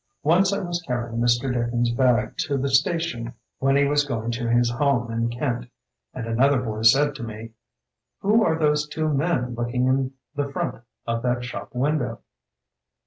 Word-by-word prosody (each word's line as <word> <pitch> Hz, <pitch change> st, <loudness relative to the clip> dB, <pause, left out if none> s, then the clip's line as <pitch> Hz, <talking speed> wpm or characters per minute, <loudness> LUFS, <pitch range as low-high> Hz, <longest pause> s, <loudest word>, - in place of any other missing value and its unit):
Once 180 Hz, +6 st, +4 dB
I 200 Hz, -, 0 dB
was 175 Hz, -1 st, -3 dB
carrying 120 Hz, -6 st, -3 dB
Mr. 120 Hz, +2 st, +2 dB
Dickens's 120 Hz, 0 st, 0 dB
bag 120 Hz, -4 st, +2 dB
to 140 Hz, -, 0 dB
the 135 Hz, +1 st, -1 dB
station 135 Hz, -4 st, 0 dB, 0.2 s
when 135 Hz, +1 st, +2 dB
he 140 Hz, 0 st, +4 dB
was 145 Hz, +1 st, +2 dB
going 120 Hz, -4 st, -3 dB
to 120 Hz, 0 st, -2 dB
his 120 Hz, 0 st, +3 dB
home 120 Hz, -2 st, +1 dB
in 115 Hz, 0 st, 0 dB
Kent, 120 Hz, -1 st, -3 dB, 0.4 s
and 125 Hz, -, -6 dB
another 130 Hz, +4 st, +3 dB
boy 110 Hz, -3 st, -4 dB
said 140 Hz, +6 st, +5 dB
to 120 Hz, -, -8 dB
me, 115 Hz, 0 st, -7 dB, 0.7 s
'Who 215 Hz, +3 st, +4 dB
are 160 Hz, -5 st, +2 dB
those 150 Hz, -1 st, +2 dB
two 155 Hz, +1 st, -2 dB
men 140 Hz, -4 st, 0 dB
looking 120 Hz, +1 st, -1 dB
in 130 Hz, 0 st, +1 dB, 0.2 s
the 140 Hz, 0 st, -2 dB
front 120 Hz, -, -3 dB, 0.2 s
of 115 Hz, 0 st, -1 dB
that 125 Hz, 0 st, 0 dB
shop 125 Hz, 0 st, -7 dB
window? 125 Hz, -3 st, -1 dB
125 Hz, 175 wpm, -24 LUFS, 120-145 Hz, 0.7 s, said